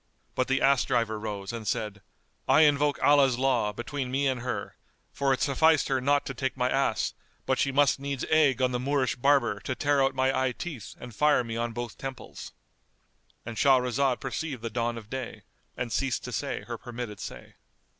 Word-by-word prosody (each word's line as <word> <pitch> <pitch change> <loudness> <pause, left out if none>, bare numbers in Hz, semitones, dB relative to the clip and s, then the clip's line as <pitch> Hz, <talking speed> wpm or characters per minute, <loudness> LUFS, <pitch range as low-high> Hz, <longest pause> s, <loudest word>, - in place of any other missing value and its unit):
But 130 - 0
the 135 0 +1
ass 135 -1 +4
driver 110 -2 0
rose 105 -1 -5
and 115 -2 -6
said 105 -1 -2 0.5
"I - - +6
invoke 145 -1 +3
Allah's 140 -4 +5
law[FN#212] 125 -6 +1
between 130 +3 -4
me 135 +2 0
and 130 -3 0
her; 125 +1 -4 0.4
for 140 -1 +1
it 130 - 0
sufficed 160 +3 +3
her 135 -1 +1
not 145 +2 +2
to - - -4
take 130 -1 -3
my 125 0 +1
ass, 135 -5 0 0.3
but 130 -1 0
she 140 - +2
must 140 -1 +3
needs 140 -1 -3
egg 140 -5 +4
on 125 - +2
the 125 - -1
Moorish 135 0 0
barber 135 -5 +2
to 115 +6 -4
tear 140 +2 +2
out 135 0 +2
my 130 0 +2
eye 130 -1 +1
teeth 140 - -7
and 125 -2 -9
fire 150 +2 +3
me 115 -1 -5
on 120 0 -2
both 120 +1 -6
temples."——And 125 -3 -11
Shahrazad 130 0 +3
perceived 135 -2 -4
the 115 - -3
dawn 120 +1 -1
of 110 -3 -9
day 130 +1 -6 0.3
and 120 -2 -3
ceased 135 -2 -1
to 125 - -6
say 140 +5 -3
her 120 -2 -6
permitted 120 -4 -7
say. - - -9
130 Hz, 195 wpm, -28 LUFS, 120-140 Hz, 0.5 s, I